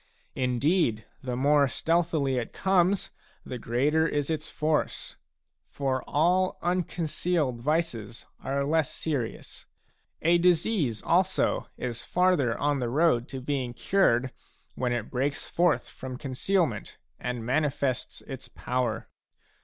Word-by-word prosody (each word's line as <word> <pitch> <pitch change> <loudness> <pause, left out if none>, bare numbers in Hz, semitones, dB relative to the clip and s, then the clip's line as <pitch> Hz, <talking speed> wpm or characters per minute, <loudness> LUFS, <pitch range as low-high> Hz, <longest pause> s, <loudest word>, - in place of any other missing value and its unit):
Indeed, 125 - +1 0.2
the 125 -2 -3
more 140 +2 +4
stealthily 160 -3 +1
it 115 - -5
comes, 190 0 +2 0.3
the 125 - -5
greater 145 +8 +2
is 145 0 -1
its 155 -1 -3
force. 155 0 -1 0.5
For 135 -2 -1
all 180 +5 +2
unconcealed 170 -6 0
vices 120 -7 -1 0.2
are 140 +1 0
less 155 0 +1
serious; 140 -8 -4 0.6
a 170 +2 +5
disease 170 - +2
also 185 +2 +2
is 120 -2 -4
farther 180 -10 +2
on 145 -1 +1
the 120 -2 -1
road 135 -3 +3
to 135 -2 -6
being 130 -3 -2
cured 130 -11 +2 0.4
when 125 -1 -1
it 120 -3 -2
breaks 135 +3 -1
forth 175 -2 +2
from 130 -1 -7
concealment 160 +7 -1 0.2
and 120 -2 -3
manifests 140 -1 -1
its - - -8
power. 125 -3 -2
145 Hz, 120 wpm, -28 LUFS, 125-165 Hz, 0.6 s, a